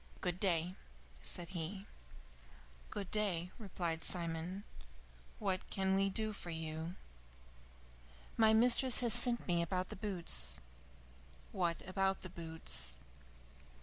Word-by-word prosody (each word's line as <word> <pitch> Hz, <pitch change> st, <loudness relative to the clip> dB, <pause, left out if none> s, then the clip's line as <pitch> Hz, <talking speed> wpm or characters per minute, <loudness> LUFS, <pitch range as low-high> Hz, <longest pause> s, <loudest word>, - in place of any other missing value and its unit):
"Good 180 Hz, 0 st, -3 dB
day," 175 Hz, -2 st, 0 dB, 0.5 s
said 170 Hz, -, -3 dB
he. 190 Hz, +2 st, -6 dB, 1.0 s
"Good 200 Hz, -2 st, -7 dB
day," 185 Hz, -5 st, -2 dB
replied 175 Hz, -6 st, -5 dB
Simon. 170 Hz, +2 st, -1 dB, 0.7 s
"What 190 Hz, -3 st, -3 dB
can 190 Hz, -1 st, -1 dB
we 195 Hz, +1 st, +1 dB
do 215 Hz, +2 st, -4 dB
for 180 Hz, -, -8 dB
you?" 160 Hz, +1 st, -6 dB, 1.4 s
"My 220 Hz, -1 st, +4 dB
mistress 245 Hz, +3 st, +7 dB
has 235 Hz, -2 st, +6 dB
sent 240 Hz, 0 st, +5 dB
me 175 Hz, -2 st, +1 dB
about 180 Hz, +2 st, -3 dB
the -, -, -7 dB
boots." 175 Hz, -, +1 dB, 0.9 s
"What 175 Hz, -3 st, -3 dB
about 190 Hz, 0 st, -2 dB
the 185 Hz, -, -9 dB
boots?" 160 Hz, -, +2 dB
185 Hz, 115 wpm, -35 LUFS, 170-200 Hz, 1.4 s, mistress